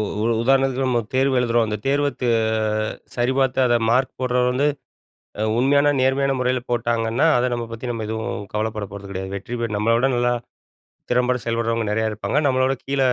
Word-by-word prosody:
உ - - +1 0.4
உதாரணத்துக்கு, 135 +1 +2
நம்ம 125 -2 +2 0.2
தேர்வு 130 0 +2
எழுதுறோம். 120 -1 +2
அந்த 105 0 -2
தேர்வத் 145 0 0 0.9
சரிபார்த்து 130 +2 +1
அத 120 -1 +3
மார்க் 130 +3 +2
போட்றவரு 125 -1 +1
வந்து, 135 +3 +1 0.7
அ - - 0 0.2
உண்மையான 140 +3 +4
நேர்மையான 135 +1 +2
முறையில 125 0 0
போட்டாங்கன்னா, 115 0 +1
அத 125 +1 +1
நம்ம 120 -1 -3
பத்தி 115 +2 -6
நம்ம 115 -2 -4
எதுவும் 110 0 -3 0.2
கவலைப்பட 110 0 -2
போறது 100 -1 -9
கிடையாது. 95 0 -5
வெற்றி 100 +5 -5
பெ 115 - 0
நம்மள 115 +3 +2
விட 125 +3 +2
நல்லா 120 0 +2 0.8
திறம்பட 125 0 +2
செயல்பட்றவங்க 115 -1 -1
நிறையா 110 +1 +1
இருப்பாங்க. 105 +7 -2
நம்மள 130 -1 +2
விட 135 +1 +1
கீழ 135 0 -2
125 Hz, 170 wpm, -22 LUFS, 115-130 Hz, 0.9 s, உண்மையான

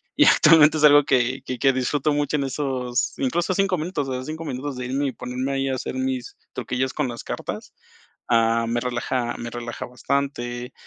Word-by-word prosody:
Y - - +5
actualmente 155 -1 +6
es 155 - -1
algo 145 -1 +8
que 130 +1 +1
que 130 - -4
que 135 +2 +4
disfruto 140 +3 0
mucho 145 +1 0
en 140 - -1
esos 130 -2 -2
incluso 170 +8 0
5 190 -1 +1
minutos, 155 -3 -3
o - - -2
sea, 130 0 -4
5 155 +4 -6
minutos 135 0 -4
de 125 - -4
irme 135 +3 -1
y - - -2
ponerme 125 +3 -4
ahí 135 0 -1
a 130 - 0
hacer 130 - -5
mis 130 -1 -3 0.2
truquillos 130 +1 -2
con 150 -3 -1
las 120 -1 -6
cartas, - - -6 0.6
ah, 115 0 +3
me 120 +1 0
relaja 120 0 -2
me 120 - -6
relaja 120 0 -6
bastante. 125 -1 -3
130 Hz, 200 wpm, -23 LUFS, 125-145 Hz, 0.6 s, algo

